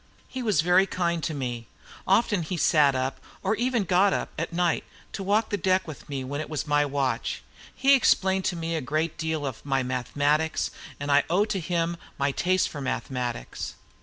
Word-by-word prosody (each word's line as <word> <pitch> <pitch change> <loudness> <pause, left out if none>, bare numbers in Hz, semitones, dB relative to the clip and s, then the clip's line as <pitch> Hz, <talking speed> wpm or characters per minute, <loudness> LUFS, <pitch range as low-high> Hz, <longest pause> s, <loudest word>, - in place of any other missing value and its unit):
He 260 - -5
was 210 -10 +2
very 180 +3 +4
kind 170 -3 -1
to 155 - -2
me. 120 -4 -4 0.4
Often 205 -1 +3
he 180 - -2
sat 145 -4 +4
up, 130 +1 -2 0.2
or - - +2
even 240 -1 +1
got 190 +2 +3
up, - - -2
at - - -3
night, 175 -1 +1 0.3
to - - -4
walk 205 +3 +1
the 205 - +1
deck 185 -1 +1
with 150 -2 -9
me, 135 -2 -3
when 145 +3 -3
it 155 - -7
was 155 -2 -2
my 145 -1 +3
watch. 135 -2 -1 0.3
He 275 +1 +5
explained 190 -7 +3
to 180 - 0
me 165 0 -2
a 160 - -1
great 155 +5 -1
deal 160 -2 -1
of 130 -5 -5
my 135 -2 0
mathematics, 145 +5 0 0.3
and 145 0 -2
I 145 0 +5
owe 190 +5 +3
to 210 -3 -2
him 170 0 -1 0.2
my 140 0 +1
taste 185 +5 +1
for 145 - -7
mathematics. 125 - -3
160 Hz, 195 wpm, -26 LUFS, 140-185 Hz, 0.4 s, He